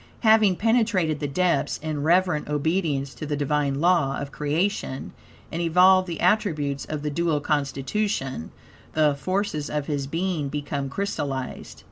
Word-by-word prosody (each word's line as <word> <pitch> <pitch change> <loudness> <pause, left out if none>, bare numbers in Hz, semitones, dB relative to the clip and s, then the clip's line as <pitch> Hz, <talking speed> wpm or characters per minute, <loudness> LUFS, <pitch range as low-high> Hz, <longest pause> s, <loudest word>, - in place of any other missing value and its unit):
Having 220 -4 +5
penetrated 210 -8 +1
the 145 - -2
depths 180 +5 +1
in 155 -2 -4
reverent 170 -1 +2
obedience 150 -2 0
to 155 - -7
the 145 -1 -1
Divine 145 -1 0
law 165 -5 +2
of 140 -1 -5
creation, 150 -1 -2 0.4
and 170 - -3
evolved 185 +3 +5
the 170 -2 -5
attributes 155 -8 +1
of 150 -1 -5
the 150 - -2
dual 160 0 +1
constitution, 140 - -2 0.4
the 155 -2 +3
forces 155 0 -2
of 150 -1 -2
his 140 -2 -2
being 165 -2 -2
become 145 -1 -3
crystallized. 140 -7 -4
155 Hz, 140 wpm, -25 LUFS, 145-185 Hz, 0.4 s, Having